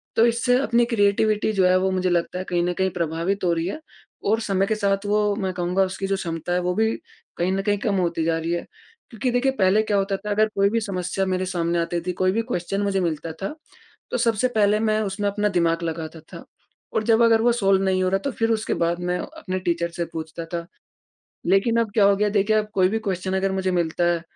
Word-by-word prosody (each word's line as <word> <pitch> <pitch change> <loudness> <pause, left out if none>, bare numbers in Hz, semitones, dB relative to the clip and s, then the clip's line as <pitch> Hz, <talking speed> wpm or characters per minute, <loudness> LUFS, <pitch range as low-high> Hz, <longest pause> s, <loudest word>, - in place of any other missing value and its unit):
तो 225 - +5
इससे 240 +1 +2
अपनी 235 -2 +2
क्रिएटिविटी 215 -1 +2
जो 190 -2 +3
है 185 0 +4
वो 190 0 +1
मुझे 185 -1 0
लगता 175 +1 0
है - - -3
कहीं 175 -1 0
न 180 0 0
कहीं 190 0 +1
प्रभावित 170 +3 -2
हो 175 - +2
रही 165 0 -1
है 255 - -4 0.5
और 225 - +3
समय 195 -2 +1
के 220 - +1
साथ 200 -1 0
वो, 210 0 +1
मैं 190 -3 -2
कहूँगा 180 +2 +1
उसकी 190 +1 -3
जो 195 - +1
क्षमता 170 -1 -3
है, 180 - +2
वो 180 0 -1
भी 220 +1 +1 0.4
कहीं 180 +2 0
न 195 0 0
कहीं 205 0 +1
कम 210 -4 0
होती 170 -2 0
जा 165 0 +1
रही 165 +1 -3
है। 170 - -3 0.5
क्योंकि 240 +3 -1
देखिए 255 +2 +2
पहले 195 +3 +4
क्या 205 -2 0
होता 195 0 0
था, 210 +1 -6
अगर 215 +1 +3
कोई 200 0 +3
भी 230 +1 +1
समस्या 190 -1 -2
मेरे 185 0 -1
सामने 170 -2 -1
आती 170 0 -1
थी 180 - 0
कोई 185 0 +3
भी 225 +3 0
क्वेश्चन 180 +3 -2
मुझे 200 -1 0
मिलता 165 -2 -2
था। 245 +11 -4 0.6
तो - - 0
सबसे 230 0 +2
पहले 210 0 +3
मैं 215 -1 +1
उसमें 200 0 -1
अपना 210 +1 0
दिमाग 170 -2 +1
लगाता 160 0 -4
था - - -9 0.5
और 220 - +1
जब 225 +1 +3
अगर 225 -1 +5
वो 240 +1 +4
सॉल्व 195 -4 +2
नहीं 185 -1 +1
हो 185 - +2
रहा, 195 +1 +1
तो 275 - -3
फ़िर 225 -1 0
उसके 215 -1 0
बाद 170 +1 0
मैं 180 0 -1
अपने 185 -2 -5
टीचर 170 -2 -1
से 170 0 -3
पूछता 160 +1 -6
था। 170 -1 -3 0.8
लेकिन 195 +5 +3
अब 220 -3 -1
क्या 210 -3 +4
हो 200 0 +5
गया, 210 +1 +1
देखिए 210 +1 +2
आप 210 0 -2
कोई 185 -1 +4
भी 225 +3 -1
क्वेश्चन 190 -2 -2
अगर 190 0 0
मुझे 190 -1 -1
मिलता 175 0 0
है। 170 -1 -2
195 Hz, 245 wpm, -23 LUFS, 175-210 Hz, 0.8 s, तो